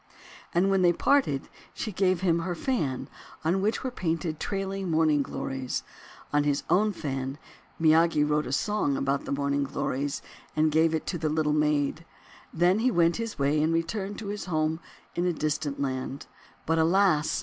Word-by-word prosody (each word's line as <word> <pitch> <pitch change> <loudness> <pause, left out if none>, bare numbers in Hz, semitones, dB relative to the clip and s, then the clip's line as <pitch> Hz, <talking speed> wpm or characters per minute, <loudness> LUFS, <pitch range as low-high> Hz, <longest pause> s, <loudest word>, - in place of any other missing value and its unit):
And 175 +2 +2
wrhen 195 -1 +3
they 175 -1 +5
parted 175 - +2 0.3
she 215 - -3
gave 185 -2 +1
him 170 -3 +2
her 175 +1 -2
fan, 160 - -1 0.4
on 180 +4 +2
which 210 +3 0
were 260 - -2
painted 165 -6 -2
trailing 195 -1 -3
Morning 155 -2 +3
Glories. 135 -1 -3 0.5
On 145 0 +3
his 145 -1 0
own 210 +3 +4
fan 135 -6 -4 0.4
Miyagi 160 -1 +4
wrote 150 0 +1
a - - -4
song 145 -2 0
about 135 +1 -1
the - - -5
Morning 140 0 0
Glories, 140 +1 -2 0.3
and 155 0 +3
gave 160 +1 +3
it 160 - -3
to 175 - -3
the 155 0 0
Little 150 -1 +1
Maid; 150 +1 +1 0.5
then 175 +5 +3
he 250 +3 +3
went 170 -6 +3
his 230 -2 -4
way 145 +2 +2
and 155 +2 +2
returned 195 +5 -2
to 210 -2 -6
his 205 0 -4
home 160 -2 0 0.3
in 175 +1 0
a 175 - +1
distant 150 -2 -2
land. 130 0 -3 0.4
But 165 +1 +1
alas! 165 -2 +3
160 Hz, 175 wpm, -27 LUFS, 145-185 Hz, 0.5 s, they